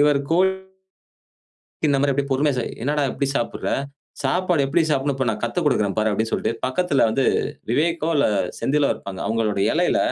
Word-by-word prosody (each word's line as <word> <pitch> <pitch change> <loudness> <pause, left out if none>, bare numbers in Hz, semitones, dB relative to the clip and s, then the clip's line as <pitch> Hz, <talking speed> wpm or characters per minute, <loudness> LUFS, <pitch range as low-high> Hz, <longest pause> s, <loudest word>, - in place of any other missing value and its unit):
இவரு 145 -1 +4
போய் 185 +3 +4 1.4
இந்த 140 -2 +3
மாரி 140 0 +2
அப்டி 140 +1 0
பொறுமையா 140 +2 +2
ச, - - 0 0.2
என்னடா 145 +3 0
இப்படி 140 - -2
சாப்பிடுற 120 - -2 0.5
சாப்பாடு 175 +4 +1
எப்படி 155 +6 +1
சாப்பிடணும் 140 -1 +1
இப்ப 130 -1 -1
நான் 105 -1 -2
கத்துக் 135 +8 -1
கொடுக்கிறேன் 105 -8 +1
பாரு 110 0 +2
அப்படின்னு 110 +2 -1
சொல்லிட்டு, - - 0
பக்கத்துல 140 +3 +1
வந்து 130 +4 +1 0.5
விவேக்கோ 160 +5 +1
இல்ல 145 - +3 0.3
செந்திலோ 145 +1 +1
இருப்பாங்க. 95 -1 -8
அவங்களோட 110 -2 0
இலையில - - +2
140 Hz, 165 wpm, -22 LUFS, 115-150 Hz, 1.4 s, இவரு